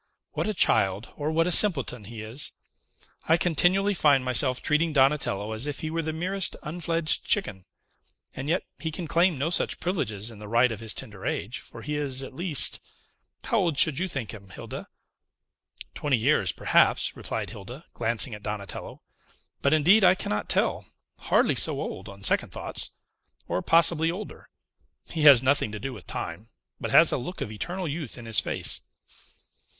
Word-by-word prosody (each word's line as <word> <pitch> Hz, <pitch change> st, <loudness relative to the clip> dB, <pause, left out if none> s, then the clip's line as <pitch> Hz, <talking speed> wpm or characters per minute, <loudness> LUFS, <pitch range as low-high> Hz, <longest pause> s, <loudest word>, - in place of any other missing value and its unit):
"What -, -, -3 dB
a 215 Hz, -, -2 dB
child, 100 Hz, -, +1 dB
or 150 Hz, +1 st, -3 dB
what 165 Hz, +1 st, +2 dB
a 180 Hz, -, 0 dB
simpleton, 135 Hz, -, +4 dB
he 110 Hz, +1 st, -8 dB
is! 115 Hz, +7 st, -5 dB, 0.7 s
I 165 Hz, -, +4 dB
continually 180 Hz, +4 st, +2 dB
find 145 Hz, -7 st, +3 dB
myself 125 Hz, 0 st, +2 dB
treating 155 Hz, +1 st, +1 dB
Donatello 135 Hz, -7 st, +1 dB
as 110 Hz, +6 st, 0 dB
if 145 Hz, -, -4 dB
he 155 Hz, -, -4 dB
were 165 Hz, +1 st, -1 dB
the 160 Hz, 0 st, -3 dB
merest 185 Hz, +4 st, -1 dB
unfledged 165 Hz, 0 st, -1 dB
chicken; 95 Hz, -, -1 dB, 0.7 s
and 135 Hz, +2 st, -6 dB
yet 175 Hz, +3 st, +1 dB, 0.2 s
he 160 Hz, -, -3 dB
can 165 Hz, +2 st, -5 dB
claim 170 Hz, +1 st, +2 dB
no 145 Hz, +5 st, -1 dB
such -, -, 0 dB
privileges 120 Hz, -, -3 dB
in 110 Hz, -, -13 dB
the 105 Hz, -, -9 dB
right 120 Hz, +3 st, +3 dB
of 110 Hz, -, -5 dB
his 110 Hz, -1 st, -4 dB
tender 105 Hz, -7 st, -8 dB
age, 115 Hz, +5 st, -3 dB
for -, -, -12 dB
he 150 Hz, 0 st, -3 dB
is 135 Hz, -2 st, -2 dB
at 135 Hz, -, -9 dB
least 170 Hz, 0 st, +1 dB, 0.6 s
how 230 Hz, -, +1 dB
old 170 Hz, -7 st, 0 dB
should 145 Hz, -2 st, +7 dB
you 190 Hz, -, -1 dB
think 125 Hz, -, -5 dB
him, 100 Hz, -3 st, -12 dB
Hilda?" 95 Hz, -, -8 dB, 1.1 s
"Twenty 145 Hz, -4 st, 0 dB
years, 110 Hz, -, +2 dB
perhaps," -, -, +2 dB
replied -, -, -5 dB
Hilda, 120 Hz, -, -10 dB
glancing 115 Hz, +1 st, +1 dB
at 105 Hz, -, -8 dB
Donatello; 105 Hz, -2 st, -6 dB, 0.6 s
"but, 140 Hz, -, +2 dB
indeed, 175 Hz, +8 st, +5 dB
I 185 Hz, -, +6 dB
cannot 105 Hz, -, -3 dB
tell; -, -, +1 dB, 0.4 s
hardly -, -, +2 dB
so -, -, +1 dB
old, -, -, -6 dB
on 100 Hz, 0 st, -12 dB
second -, -, +1 dB
thoughts, -, -, -3 dB, 0.6 s
or -, -, -1 dB
possibly 165 Hz, -, +3 dB
older. 190 Hz, +5 st, -7 dB, 0.6 s
He 160 Hz, -, -3 dB
has 135 Hz, -4 st, +9 dB
nothing 130 Hz, -5 st, +1 dB
to 105 Hz, -, -6 dB
do 135 Hz, +2 st, -5 dB
with 100 Hz, -8 st, -12 dB
time, 100 Hz, +7 st, -6 dB, 0.3 s
but -, -, -4 dB
has -, -, +6 dB
a -, -, 0 dB
look 180 Hz, +10 st, -7 dB
of 105 Hz, -, -4 dB
eternal 175 Hz, -, -4 dB
youth 150 Hz, -4 st, -5 dB
in 120 Hz, -, -10 dB
his 115 Hz, -1 st, +3 dB
face." -, -, 0 dB
140 Hz, 180 wpm, -26 LUFS, 110-165 Hz, 1.1 s, has